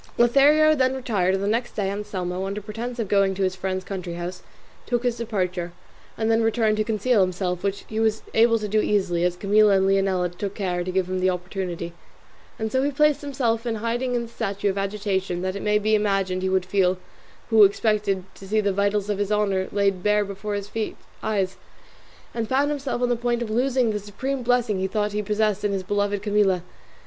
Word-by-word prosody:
Lothario 290 +6 +5
then 260 -3 +2
retired, 200 -8 0
and 195 - -2
the - - 0
next 230 +3 -1
day 200 -2 -1
Anselmo, 190 -2 -3
under 200 +1 -3
pretence 230 +4 -6
of 225 -3 -2
going 195 -1 +2
to 195 - -1
his 185 0 0
friend's 185 0 -3
country 185 -3 -5
house, 175 +1 -5 0.5
took 240 0 0
his 245 -1 0
departure, 185 -6 -2 0.4
and 225 0 +1
then 225 0 +3
returned 225 -1 +2
to 215 - +2
conceal 220 +1 +2
himself, 180 -1 -1
which 200 0 -3
he 220 - -3
was 220 -1 +1
able 230 +1 +5
to 215 -1 -4
do 215 +1 +2
easily, 190 -5 +1
as 180 0 +1
Camilla 205 +1 +4
and 190 - +2
Leonela 195 -2 +2
took 200 +1 -4
care 180 -3 -1
to 185 - -5
give 185 -1 0
him 185 0 -2
the 185 0 +2
opportunity; 180 -2 -4 0.6
and 220 0 -3
so 260 - +2
he 280 - +1
placed 300 +1 +2
himself 250 -6 -1
in 235 -2 -2
hiding 240 +3 -1
in 240 - 0
the - - -7
state 200 -4 -4
of 200 -2 +2
agitation 195 -3 -2
that 185 0 -2
it 200 - -4
may 210 0 +2
be 215 +1 0
imagined 195 -3 +1
he 190 - 0
would 190 -1 +1
feel 185 -1 +2 0.5
who 220 -1 +8
expected 200 -1 +2
to 195 - -12
see 215 +2 +1
the 200 -2 +1
vitals 200 +1 0
of 205 -1 -2
his 205 0 -1
honour 200 -3 +1
laid 195 -2 +1
bare 210 +1 +2
before 200 +1 -4
his 205 0 -5 0.5
eyes, 195 -3 -1 0.8
and 230 -2 -3
found 280 +3 +2
himself 275 -4 -2
on 245 - +2
the 245 - +2
point 240 0 -1
of 220 - -5
losing 250 0 +2
the 210 - -2
supreme 255 +7 -4
blessing 240 -4 +1
he 190 - 0
thought 210 +2 -1
he 210 +1 -1
possessed 210 0 0
in 205 - +1
his 195 -1 -2
beloved 205 0 -1
Camilla. 205 -4 +2
205 Hz, 215 wpm, -24 LUFS, 190-225 Hz, 0.8 s, who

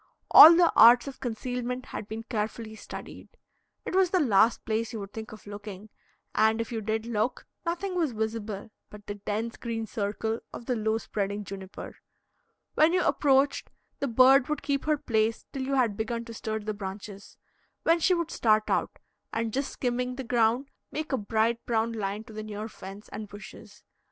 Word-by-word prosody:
All 330 +2 +12
the 345 -1 +4
arts 240 +4 +8
of 275 - -8
concealment 250 +1 -4
had 210 - -7
been 220 +1 -6
carefully 220 0 -4
studied. 220 - -9 0.6
It - - -4
was 375 -1 +4
the 370 - +2
last 230 - +3
place 220 +1 -1
you 225 - -4
would 200 0 -8
think 220 0 -7
of 215 - -12
looking, 205 0 -9 0.4
and, 220 +1 +3
if 230 - -3
you 225 -2 -3
did 220 +1 -2
look, 235 +2 -1 0.2
nothing 365 +3 -2
was 335 -6 0
visible 220 -1 -4 0.2
but 210 -1 -13
the 205 - -4
dense 210 +3 -4
green 225 -2 -4
circle 220 +2 -2
of 235 - -9
the 250 - 0
low 220 0 0
spreading 205 -2 -3
juniper. 190 -1 -9 0.8
When 315 +3 +4
you 365 - +2
approached, 275 -1 +2 0.3
the 280 - -1
bird 255 +3 +5
would 300 -2 -2
keep 280 -1 -1
her 305 -1 +2
place 220 -3 0
till 270 - -4
you 270 +1 -1
had 240 -6 +2
begun 230 +2 -3
to 230 - -9
stir 220 -1 -3
the 215 +1 -3
branches, 200 0 -8 0.5
when 335 +1 +4
she 365 +3 +3
would 340 -2 -2
start 215 -2 +2
out, - - 0 0.3
and, 225 -1 -2
just 275 +1 -1
skimming 250 0 -2
the 265 - -5
ground, 240 +3 +1 0.2
make 310 0 -4
a 265 - +1
bright 225 +2 0
brown 230 -1 +1
line 205 -1 -3
to 225 -1 -13
the 215 - -5
near 215 0 -6
fence 195 -1 -10
and 215 0 -7
bushes. 205 +1 -12
225 Hz, 185 wpm, -28 LUFS, 215-255 Hz, 0.8 s, All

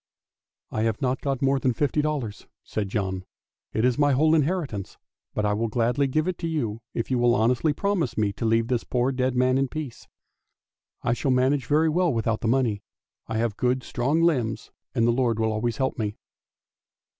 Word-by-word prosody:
" - - -68
" - - -68
I 110 - -1
have 110 -1 0
not 130 -1 -1
got 135 -2 -1
more 135 0 +3
than 130 -1 +1
fifty 145 +4 +1
dollars," 140 -9 -3 0.2
said 105 -3 -3
John; 95 -2 -2 0.3
" - - -68
it 110 - +2
is 125 +2 +2
my 145 -1 +4
whole 155 +4 +4
inheritance, 150 - -1 0.4
but 105 - 0
I 105 - +2
will 115 +2 0
gladly 120 +5 +1
give 155 +5 0
it 185 - -2
to 170 - -2
you 115 -9 -2
if 115 +2 -2
you 125 - +2
will 120 0 +4
honestly 125 +7 +2
promise 175 -6 -1
me 105 -2 +1
to 115 - -4
leave 115 +1 +3
the 125 -2 0
poor 125 +1 +1
dead 130 -1 0
man 130 +1 +3
in 135 - +1
peace. 145 -3 -7 1.0
I 115 - +2
shall 130 +3 -1
manage 130 +1 +2
very 155 +2 +3
well 175 +2 +2
without 115 -2 -1
the - - -1
money, 115 -4 +1 0.5
I 110 - -2
have 115 -2 -1
good 125 +1 +1
strong 145 +7 0
limbs, 125 -10 0 0.2
and 115 -2 +3
the 120 - +4
Lord 120 -2 +1
will 110 -1 +1
always 110 +1 -1
help 130 -2 -1
me." 105 -1 -2
125 Hz, 210 wpm, -25 LUFS, 115-140 Hz, 1.0 s, my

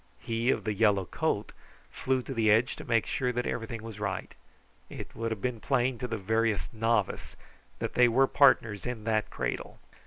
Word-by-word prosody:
He 115 +2 -1
of - - +1
the 110 - -1
yellow 105 -3 +3
coat 75 - -2 0.4
flew 130 -1 -1
to 135 - -5
the 115 -3 +2
edge 110 +4 +3
to - - -8
make 115 -2 +3
sure 125 -1 -1
that 125 0 -2
everything 115 -1 -4
was 110 -2 -8
right. 105 -1 -3 0.6
It - - -8
would 115 0 -2
have 110 -3 -5
been 125 -2 -1
plain 125 -1 0
to 125 - -3
the 115 - -3
veriest 110 -3 0
novice 115 -2 0 0.4
that - - -3
they 125 0 +6
were 130 +3 +4
partners 120 -7 +3
in 120 -3 -4
that 110 -1 0
cradle. - - -4
115 Hz, 190 wpm, -29 LUFS, 110-125 Hz, 0.6 s, they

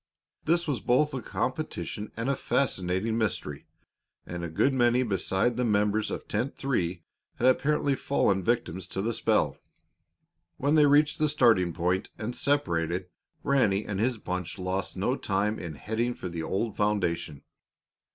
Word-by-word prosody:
This 170 +2 +2
was 140 -6 0
both 130 +7 +2
a 130 - -3
competition 105 -1 -3
and 115 +2 -2
a 140 - +2
fascinating 110 -4 0
mystery, 75 -10 -2 0.6
and 85 -1 -5
a 85 - -3
good 130 - +2
many 120 0 +3
beside 100 +2 0
the 125 - +1
members 105 -1 +1
of - - -5
Tent 135 +3 -2
Three 90 -11 -1 0.3
had 125 - +2
apparently 140 +2 +2
fallen 100 -8 +1
victims 95 -6 -1
to 95 - -3
the 115 +2 0
spell. - - +1 1.0
When 145 +3 +1
they 150 -2 +6
reached 150 +2 +4
the 155 0 +3
starting 115 - +4
point 90 +3 -1
and 115 +3 -4
separated, 90 - 0 0.3
Ranny 110 -8 +2
and 100 -2 -3
his 120 +2 +1
bunch 90 -4 -4
lost 95 +1 -3
no 125 +7 +1
time 105 -2 -1
in 85 -4 -6
heading 110 - -2
for 90 - -6
the 85 -1 -4
old 100 +6 -2
foundation. 90 -8 -1
110 Hz, 155 wpm, -28 LUFS, 90-130 Hz, 1.0 s, they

